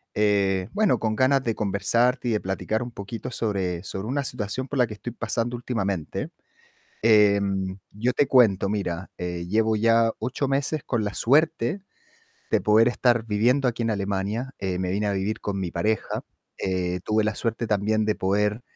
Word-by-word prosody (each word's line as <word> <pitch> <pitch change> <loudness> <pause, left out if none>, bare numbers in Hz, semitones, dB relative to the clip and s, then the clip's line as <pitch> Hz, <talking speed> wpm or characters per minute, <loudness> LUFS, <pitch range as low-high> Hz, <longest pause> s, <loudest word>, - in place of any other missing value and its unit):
eh, 100 -3 +2
bueno, 210 -1 +3
con 110 -1 -1
ganas 135 +2 +3
de 115 - 0
conversar 115 +6 +1
y 120 - 0
de 105 - +1
platicar 105 +4 -2
un 120 - -4
poquito 115 +3 -7
sobre 95 -7 -2
sobre 95 +2 -5
una 140 +3 -1
situación 125 +1 -3
por 140 -1 -3
la 125 - +4
que 105 - -7
estoy 120 - -6
pasando 115 +1 -2
últimamente. 100 -9 -3 0.7
Em, 100 -3 +3
yo 120 +5 -1
te 145 - +3
cuento. 110 -8 +4
Mira, 95 -3 -3
eh, 90 -1 -4
llevo 110 +2 +2
ya 115 +1 +3
8 130 +2 -2
meses 140 +3 0
con 120 -4 0
la 105 -1 -3
suerte 155 - +2 0.7
de - - +3
poder 110 +2 +5
estar 120 -2 +2
viviendo 120 +5 +2
aquí 115 0 -2
en 115 - +1
Alemania. 100 +5 -2
Eh, 95 -2 -2
me 90 -1 -1
vine 105 +3 0
a 100 - +1
vivir 100 +2 -2
con 100 -1 -3
mi 90 -2 -3
pareja. 105 +6 -1 0.3
Eh, 90 -1 -1
tuve 110 0 +2
la 105 0 -1
suerte 115 0 -2
también 110 +1 +1
de 105 0 +1
poder, 105 +4 0
110 Hz, 180 wpm, -25 LUFS, 100-120 Hz, 0.7 s, poder